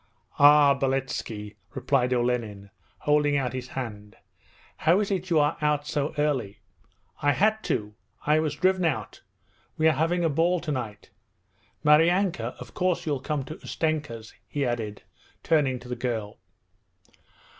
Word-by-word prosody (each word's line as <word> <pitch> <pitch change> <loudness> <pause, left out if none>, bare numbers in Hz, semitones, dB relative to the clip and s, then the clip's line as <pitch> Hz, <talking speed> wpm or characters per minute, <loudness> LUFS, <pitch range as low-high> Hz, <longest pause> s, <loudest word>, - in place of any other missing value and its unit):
'Ah, 145 0 +7
Beletski,' 130 -6 -3 0.2
replied 130 -3 +1
Olenin, 120 -5 -1 0.3
holding 145 -1 +2
out 130 -3 -1
his 130 -1 -5
hand. 105 -6 -7 0.6
'How 170 +5 +3
is 210 -1 -1
it 185 -1 -2
you 165 - +3
are 150 0 +2
out 150 -1 +1
so 145 +1 -2
early?' 135 -9 0 0.6
'I 145 - +3
had 215 +4 +2
to. 105 0 -2 0.3
I 150 +1 +4
was 155 -2 -1
driven 185 +3 +2
out; 160 -5 -2 0.6
we 160 - +3
are - - +6
having 170 +3 +1
a - - +4
ball 170 +4 +2
tonight. 120 -11 -5 0.7
Maryanka, 160 - +3
of 125 -2 -10
course 180 -1 0
you'll 145 -4 -1
come 145 +1 -2
to 155 +5 -8
Ustenka's?' 150 -9 -3
he 145 -2 -2
added, 115 -4 -3 0.4
turning 145 -5 +2
to 125 - -12
the 125 - -3
girl. 115 -4 -4
145 Hz, 145 wpm, -26 LUFS, 125-155 Hz, 0.7 s, Ah